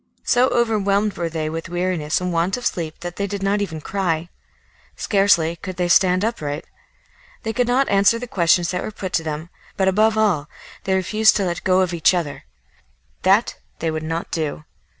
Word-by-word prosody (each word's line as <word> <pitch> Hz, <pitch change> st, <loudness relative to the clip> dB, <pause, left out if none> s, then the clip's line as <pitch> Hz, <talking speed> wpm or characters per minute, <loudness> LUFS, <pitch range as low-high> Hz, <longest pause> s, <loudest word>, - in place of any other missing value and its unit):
So 250 Hz, +1 st, +3 dB
overwhelmed 210 Hz, -4 st, +1 dB
were 170 Hz, -1 st, -2 dB
they 160 Hz, -1 st, -3 dB
with 165 Hz, +2 st, -5 dB
weariness 175 Hz, -3 st, -1 dB
and 180 Hz, -1 st, -3 dB
want 170 Hz, +6 st, +1 dB
of 245 Hz, -, -7 dB
sleep 160 Hz, -3 st, -3 dB
that 175 Hz, 0 st, -6 dB
they 200 Hz, -, -1 dB
did 200 Hz, 0 st, -5 dB
not 200 Hz, +1 st, +1 dB
even 160 Hz, -6 st, -4 dB
cry. 175 Hz, -3 st, -2 dB, 0.7 s
Scarcely 170 Hz, -5 st, +2 dB
could 185 Hz, 0 st, -7 dB
they 180 Hz, -1 st, 0 dB
stand 185 Hz, +2 st, +4 dB
upright. 150 Hz, -10 st, -3 dB, 0.8 s
They 225 Hz, -1 st, -2 dB
could 245 Hz, +1 st, +1 dB
not 260 Hz, +3 st, +2 dB
answer 200 Hz, +3 st, +4 dB
the 245 Hz, -, -5 dB
questions 175 Hz, -5 st, +2 dB
that 180 Hz, -, -2 dB
were -, -, -4 dB
put 190 Hz, -3 st, -6 dB
to 165 Hz, -, +1 dB
them, 155 Hz, +2 st, -5 dB, 0.3 s
but 190 Hz, -, +2 dB
above 215 Hz, +3 st, +3 dB
all 180 Hz, -9 st, +1 dB, 0.4 s
they 190 Hz, -1 st, +1 dB
refused 215 Hz, +4 st, +3 dB
to 200 Hz, -, +1 dB
let 175 Hz, -2 st, -3 dB
go 185 Hz, 0 st, +3 dB
of 180 Hz, -1 st, 0 dB
each 170 Hz, +2 st, +3 dB
other; 160 Hz, -5 st, -4 dB, 0.8 s
that 195 Hz, +5 st, +3 dB, 0.2 s
they 165 Hz, 0 st, -2 dB
would 155 Hz, 0 st, -3 dB
not 165 Hz, +2 st, -4 dB
do. 155 Hz, -1 st, -3 dB
185 Hz, 190 wpm, -21 LUFS, 165-205 Hz, 0.8 s, stand